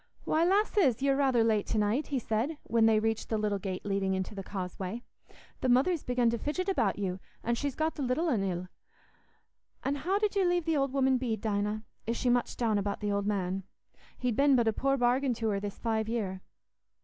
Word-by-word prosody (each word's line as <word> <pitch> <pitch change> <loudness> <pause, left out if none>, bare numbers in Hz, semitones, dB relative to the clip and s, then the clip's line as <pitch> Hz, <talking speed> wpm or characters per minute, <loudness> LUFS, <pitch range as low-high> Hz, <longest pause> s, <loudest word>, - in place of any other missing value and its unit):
"Why, 320 - +2
lasses, 370 - +3
ye're 275 -1 +3
rather 265 -4 +3
late 215 -2 +1
to 225 - -1
night," 215 +8 +1
he 280 - -1
said, 240 +6 -1
when 225 0 +3
they 220 -1 +4
reached 225 0 -1
the 220 - +1
little 210 -2 0
gate 190 -1 -5
leading 195 -1 0
into 190 +2 -3
the 195 - -5
causeway. 190 +3 -5 0.6
"The 255 - 0
mother's 280 +7 +3
begun 245 -2 +2
to 235 - -2
fidget 365 - -2
about 245 - +1
you, 190 -2 -2 0.2
an' 235 - 0
she's 280 +3 -2
got 315 +1 0
the 295 - -6
little 270 +6 0
un 230 -11 +1
ill. 180 -1 -2 1.2
An' 270 - 0
how 365 +8 0
did 420 0 0
you 395 - +3
leave 350 -2 +1
the 325 -1 +1
old 275 -2 +1
woman 265 -1 +2
Bede, 230 -4 -2
Dinah? 210 0 -1 0.2
Is 230 +1 -1
she 250 - +1
much 245 -1 0
down 220 -4 +1
about 200 0 -2
the 205 -1 -1
old 200 0 0
man? 190 -2 -1 0.6
He'd 250 -3 -1
been 280 +1 +5
but 235 -2 +3
a 220 - +3
poor 275 +4 +1
bargain 250 +1 +2
to 225 -1 -1
her 200 -1 0
this 200 0 -5
five 220 -1 -1
year." 195 -5 -2
230 Hz, 220 wpm, -30 LUFS, 205-275 Hz, 1.2 s, been